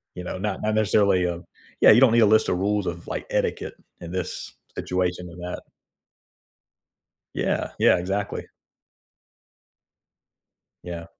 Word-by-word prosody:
you 90 - -6
know? 90 - -5
Not 100 0 -3
not 110 0 0
necessarily, 100 -4 +3
um 85 0 -5 0.4
yeah, - - +9
you 120 +4 +6
don't 130 - +7
need 115 - +4
a 110 - +6
list 110 +1 +4
of 90 - 0
rules 105 0 0
of, 85 -1 -5
like, - - -4
etiquette - - -1 0.3
in 85 - -8
this 90 -2 -5 0.2
situation 90 -1 -2
than 85 0 -12
that. 90 0 -6 1.7
Yeah, - - -1
yeah, - - +5
exactly. 100 +3 -3 2.4
Yeah. 85 -1 -7
90 Hz, 140 wpm, -24 LUFS, 90-105 Hz, 2.4 s, yeah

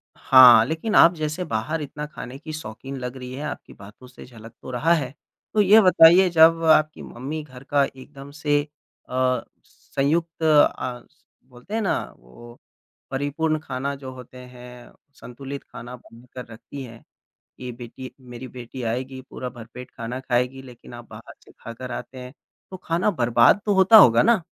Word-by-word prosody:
हाँ, 125 -4 +7
लेकिन 165 +8 -3
आप 170 +2 +7
जैसे 155 +3 -4
बाहर 150 +6 -3
इतना 150 +1 -6
ख़ाने 135 -3 -9
की 155 0 -9
शौकीन 135 -1 -8
लग 125 +1 -6
रही 125 0 -8
है 140 +3 -6
आपकी - - -9
बातों 105 +6 -15
से 125 - -14
झलक 115 -2 -14
तो 130 - -9
रहा 160 +8 +2
है। 140 -5 -2 0.4
तो 210 - +3
ये 210 +3 +6
बताइए 180 0 +6
जब 165 0 +5
आपकी 155 -1 +3
मम्मी 150 +6 -7
घर 130 -3 -14
का 140 0 +1
एकदम 135 +1 -12
से 145 -1 0 0.5
अ, 130 0 0 0.2
संयुक्त 165 +4 -3
अ, 145 -5 +2
स 150 - -35 0.3
बोलते 125 - -13
हैं 225 - 0
ना? 195 - 0 0.2
वो 120 - -16 0.5
परिपूर्ण 155 +3 -1
ख़ाना 140 -1 -4
जो 135 -1 -9
होते 125 0 -13
हैं, 125 -1 -13 0.2
संतुलित 135 +3 -9
ख़ाना 125 +1 -10
बनाकर 125 +1 -13
रखती 135 +4 -10
है 115 -2 -11 0.6
के 125 -1 -6
बेटी 120 +2 -10
मेरी 125 0 -10
बेटी 125 +1 -10
आएगी 130 +2 -5
पूरा 125 - -6
भरपेट 120 +2 -12
ख़ाना 120 +2 -6
ख़ाएगी 125 +1 -2
लेकिन 125 -2 -14
आप 120 -1 -11
बाहर - - -12
से - - -18
ख़ाकर 120 +2 -10
आते 130 +2 -8
हैं। 125 +1 -10 0.4
तो 185 - -7
ख़ाना 175 +3 -1
बर्बाद 120 - +3
तो 205 - +2
होता 190 +4 +7
होगा 115 - +7
ना? 230 -3 +3
130 Hz, 170 wpm, -23 LUFS, 125-155 Hz, 0.6 s, हाँ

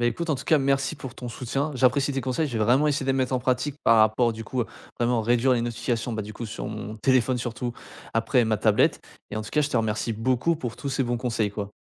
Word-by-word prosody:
Beh, 120 - +2
écoute, 170 +6 -3
en - - +3
tout 130 - -6
cas, 155 - +4
merci 135 +2 +1
pour 130 -3 -8
ton 125 - -7
soutien. 135 +5 -2
J'apprécie 135 +2 +2
tes 135 - -1
conseils, 135 +4 -1
je 120 - -3
vais 110 - +2
vraiment 130 +7 +4
essayer 145 -2 0
de 135 - +2
les - - -1
mettre 130 -1 0
en - - +2
pratique 130 +3 -1
par 115 -1 +6
rapport, 110 +2 +4
du 110 0 -7
coup, 125 0 -1
à - - -7 0.3
vraiment 120 0 +2
réduire 120 +3 +3
les 120 - +2
notifications, 120 0 -2
bah, 110 - -2
du 105 +1 -8
coup, 115 +2 -6
sur 110 +2 -6
mon 110 0 -6
téléphone 130 +1 +2
surtout, 120 0 -3 0.4
après 115 +2 +3
ma 110 -1 +1
tablette 105 0 +3 0.3
et 105 - -4
en 110 - -2
tout 110 - -9
cas, 150 - +2
je 145 - +1
te - - 0
remercie 110 0 0
beaucoup 130 +8 +1
pour 120 -6 -5
tous 140 - -5
ces 135 0 0
bons 120 0 -1
conseils, 115 -4 -1
quoi. 105 0 -5
120 Hz, 275 wpm, -25 LUFS, 115-135 Hz, 0.4 s, par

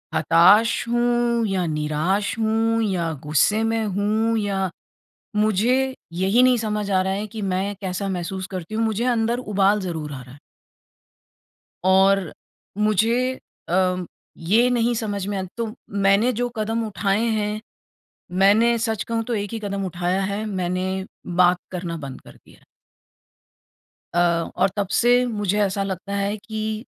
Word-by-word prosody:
हताश 205 +9 +4
हूँ 240 -1 +1
या 190 -2 0
निराश 155 +8 -1
हूँ 225 +1 +1
या 175 -6 -1
गुस्से 180 +9 +2
में 225 0 0
हूँ 215 +3 0
या 195 -2 -1 0.7
मुझे 235 +6 +2 0.2
यही 195 +8 +3
नहीं 255 -1 +5
समझ 210 -2 -2
आ 185 - +3
रहा 190 +1 -1
है 205 +2 -3
कि 215 +1 -7
मैं 195 +1 -1
कैसा 190 +1 -3
महसूस 185 +1 -4
करती 185 +2 -5
हूँ। 225 - +1
मुझे 225 +2 0
अंदर 235 -1 +1
उबाल 205 -3 +2
ज़रूर 160 -5 -4
आ 130 - -7
रहा 125 0 -13
है। 145 - -15 1.5
और 190 -1 +4 0.5
मुझे 225 +5 +2 0.4
अ, 180 0 +1 0.3
ये 220 +9 +3
नहीं 240 -1 +1
समझ 205 -4 -3
में 205 -1 -2
आ 190 - -2
तो 225 -2 -3 0.2
मैंने 200 +4 +3
जो 245 +2 -1
कदम 225 +1 -1
उठाए 205 +1 0
हैं 210 +1 -2 0.8
मैंने 225 +4 +5
सच 220 -2 -1
कहूँ 230 -1 -1
तो 240 - -3
1 205 -1 -3
ही 225 - -3
कदम 200 -2 -3
उठाया 180 +2 -1
है। 200 +2 -2
मैंने 190 -1 -2 0.3
बात 180 0 +5
करना 175 -2 -4
बंद 135 -3 -8
कर - - -15
दिया - - -19
है। - - -27 1.5
अ, 175 - +2 0.4
और 195 - +3
तब 200 -2 0
से 245 +1 +4
मुझे 205 -4 -1
ऐसा 200 0 0
लगता 195 +1 -5
है 200 +1 -1
कि, 220 +1 -4
205 Hz, 155 wpm, -22 LUFS, 185-225 Hz, 1.5 s, नहीं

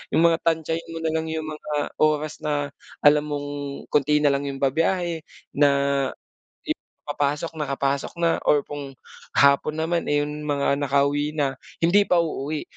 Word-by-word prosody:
'Yung 160 - +4
mga 165 -1 +4
tantiyahin 165 0 -1
mo - - -4
nalang 160 0 -1
'yung 160 0 -3
mga 150 -1 -3
oras 155 0 +1
na 145 -1 -2 0.3
alam 150 0 +5
mong 145 -1 -3 0.4
konti 150 +1 +3
na 145 - +5
lang 140 +1 -1
'yung 135 0 -5
babiyahe 165 +3 0 0.2
na 145 0 +4 1.0
i - - +3 0.4
papasok, 145 +3 -1
nakapasok 140 -1 -1
na 165 -1 +3
or 145 -1 +4
kung 140 -2 -7 0.4
hapon 140 +2 +4
naman, 165 +2 -1
eh, 145 0 +2
'yung 150 +1 -5
mga 140 -1 +1
nakauwi 145 +1 +1
na 140 -3 -1 0.2
hindi 200 +5 +5
pa 175 -1 +4
uuwi. 155 -1 -3
150 Hz, 155 wpm, -24 LUFS, 145-160 Hz, 1.0 s, alam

